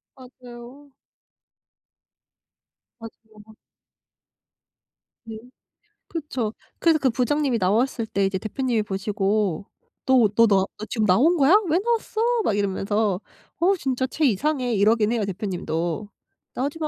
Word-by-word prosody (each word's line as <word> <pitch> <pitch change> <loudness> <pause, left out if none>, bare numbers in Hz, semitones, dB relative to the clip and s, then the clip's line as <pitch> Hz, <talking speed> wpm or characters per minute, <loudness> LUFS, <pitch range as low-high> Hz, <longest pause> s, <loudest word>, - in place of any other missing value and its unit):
맞아요. 255 +2 -14 2.1
맞아요. 220 -1 -14
맞 220 - -17 1.7
네. 225 -1 -8 0.7
그쵸. 260 -9 -4 0.3
그래서 325 -2 +3
그 265 - +2
부장님이 265 +1 0
나왔을 225 +5 0
때 200 -3 -1
이제 195 0 -1
대표님이 230 +2 -2
보시고 200 -2 -1 0.4
"너 255 -4 +5
너 230 - +6
너 195 -2 +2
너 215 - -6
지금 220 -3 0
나온 290 - +4
거야? 290 +6 +5
왜 335 +4 +3
나왔어?" 450 0 -1 0.2
막 205 - 0
이러면서 200 0 0 0.4
"어 375 +4 +3
진짜 260 -3 -1
쟤 310 +3 -1
이상해." 255 +1 0
이러긴 210 +2 +3
해요 230 -3 0
대표님도. 185 -1 -3 0.4
"나오지 285 +5 -3
마." 310 - -1
230 Hz, 250 characters per minute, -23 LUFS, 205-270 Hz, 2.1 s, 너